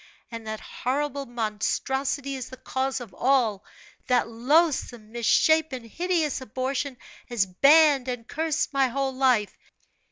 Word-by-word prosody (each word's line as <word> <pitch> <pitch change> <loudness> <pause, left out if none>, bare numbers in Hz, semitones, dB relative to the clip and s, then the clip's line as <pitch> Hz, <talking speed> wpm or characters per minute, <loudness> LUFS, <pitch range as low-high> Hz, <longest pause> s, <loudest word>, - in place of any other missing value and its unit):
And 230 -1 -7
that 220 0 -4
horrible 280 +2 -3
monstrosity 265 +5 -2
is 260 -2 -6
the 260 - -10
cause 260 +1 -2
of 225 -7 -10
all 240 -6 +1 0.4
that 250 -2 +2
loathsome, 245 -2 +1
misshapen, 260 +3 +2
hideous 325 +3 -1
abortion 260 +2 -3 0.3
has 235 -5 +1
banned 275 - +5
and 245 -2 -4
cursed 315 -1 -1
my 270 -1 +3
whole 270 +1 -2
life! 255 -6 +2
260 Hz, 125 wpm, -26 LUFS, 235-280 Hz, 0.4 s, banned